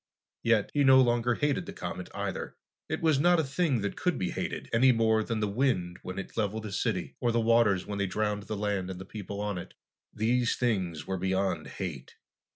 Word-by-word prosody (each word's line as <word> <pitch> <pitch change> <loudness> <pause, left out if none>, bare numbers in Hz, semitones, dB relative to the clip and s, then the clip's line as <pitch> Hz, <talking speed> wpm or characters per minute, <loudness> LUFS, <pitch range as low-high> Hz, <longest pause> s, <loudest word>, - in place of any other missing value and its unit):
Yet, 115 -3 +2
he 145 - +3
no 130 -1 +7
longer 120 -1 +3
hated 145 -2 0
the - - -6
comet, - - -6
either. - - -4 0.3
It - - -3
was 155 -4 +4
not 175 +3 +5
a - - +2
thing 140 -3 0
that 100 - -2
could 180 -2 0
be 90 -2 -1
hated, - - -4
any 130 +3 +6
more 110 -2 +3
than 110 -1 -2
the 105 - +1
wind 100 -6 0
when 90 +1 -7
it 100 - -6
leveled 110 0 -1
a 105 - -5
city, 95 - -2
or 120 - +1
the 115 - +2
waters 115 -5 +3
when 100 -1 -4
they 100 - +1
drowned 105 +2 -1
the 110 0 -3
land 100 -3 -1
and 90 -1 -6
the 95 - -8
people 100 0 -7
on 105 -3 -2
it. - - -10 0.4
These 120 +2 +1
things 95 - -1
were 95 - -2
beyond 95 +1 0
hate. - - -6
110 Hz, 215 wpm, -29 LUFS, 100-120 Hz, 0.4 s, no